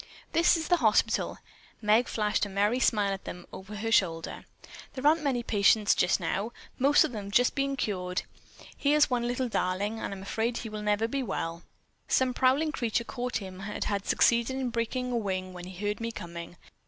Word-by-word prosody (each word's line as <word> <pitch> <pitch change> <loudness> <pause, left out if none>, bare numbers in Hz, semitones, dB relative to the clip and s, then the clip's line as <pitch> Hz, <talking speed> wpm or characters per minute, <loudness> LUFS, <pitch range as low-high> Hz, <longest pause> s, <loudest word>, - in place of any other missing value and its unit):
"This 335 +1 +4
is 320 - -3
the 355 - +4
hospital." - - +2 0.4
Meg 220 +3 +3
flashed 210 -1 0
a - - -10
merry 205 +5 +1
smile 205 -6 +2
at 195 - -7
them 175 0 -7
over 195 +3 -8
her 225 +2 -3
shoulder. 165 -7 +1 0.5
"There 260 +1 -5
aren't 315 +2 +5
many 265 -5 0
patients 210 -1 +4
just 180 - +2
now. 220 +5 -2 0.3
Most 280 +3 +5
of - - -2
them 205 -4 -6
have 245 +4 +3
been 275 -1 0
cured. 180 -7 -2 0.5
Here's 295 -1 +3
one 240 -1 +1
little 250 +1 -1
darling, 205 +1 -1
and - - -4
I'm 195 -1 -7
afraid 225 +4 -1
he 225 - -5
never 210 0 -1
will 225 - -1
be 275 - -1
well. 170 -7 -3 0.5
Some 260 -1 +2
prowling 270 +5 +2
creature 235 -5 -1
caught 250 +1 -3
him 190 -2 -8
and 205 +1 -4
had 200 -1 -2
succeeded 235 +2 +3
in 260 -2 -2
breaking 250 +2 -2
a 240 - 0
wing 185 -4 -3
when 180 0 -8
it 185 -1 -10
heard 205 +3 -2
me 230 0 -2
coming. 170 -3 -8
220 Hz, 195 wpm, -29 LUFS, 195-250 Hz, 0.5 s, aren't